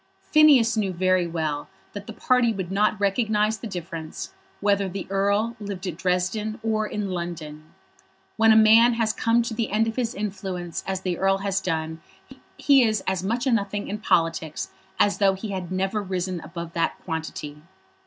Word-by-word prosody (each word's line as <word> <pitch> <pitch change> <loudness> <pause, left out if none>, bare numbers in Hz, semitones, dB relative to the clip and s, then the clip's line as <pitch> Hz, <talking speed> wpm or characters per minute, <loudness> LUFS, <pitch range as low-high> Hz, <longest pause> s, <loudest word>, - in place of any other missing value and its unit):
Phineas 280 -7 +6
knew 205 -3 0
very 185 0 +2
well 155 -3 -3 0.2
that 205 0 -8
the - - -7
party 250 -2 +2
would 190 -4 -4
not 210 +1 +1
recognise 215 +1 +1
the 230 - -6
difference 170 -4 -6 0.3
whether 200 -1 +1
the 195 +1 -5
Earl 200 +4 +1
lived 200 -3 -6
at 180 -4 -3
Dresden 185 +5 -1
or 215 -1 0
in 205 -2 -3
London. 160 -4 -5 0.7
When 225 0 +5
a - - +6
man 225 +2 +6
has 225 -1 +1
come 230 +2 +2
to 230 - -4
the 220 0 -2
end 215 +2 +2
of 225 - -4
his 245 -1 -1
influence 190 -4 -4
as 190 -1 -2
the 180 -2 -2
Earl 195 0 +3
had 195 0 -3
done 160 -2 -3 0.6
he 280 -2 +5
is 215 -3 +1
as 190 -1 0
much 235 +5 -1
a 265 - +2
nothing 205 -2 -1
in 210 +2 -4
politics 165 -5 0 0.3
as 205 - +3
though 195 -2 +4
he 205 +3 -6
had 185 -3 -5
never 195 +3 -1
risen 185 -2 -3
above 170 0 -7
that 165 -1 0
quantity. 160 -3 -5
195 Hz, 180 wpm, -24 LUFS, 180-220 Hz, 0.7 s, Phineas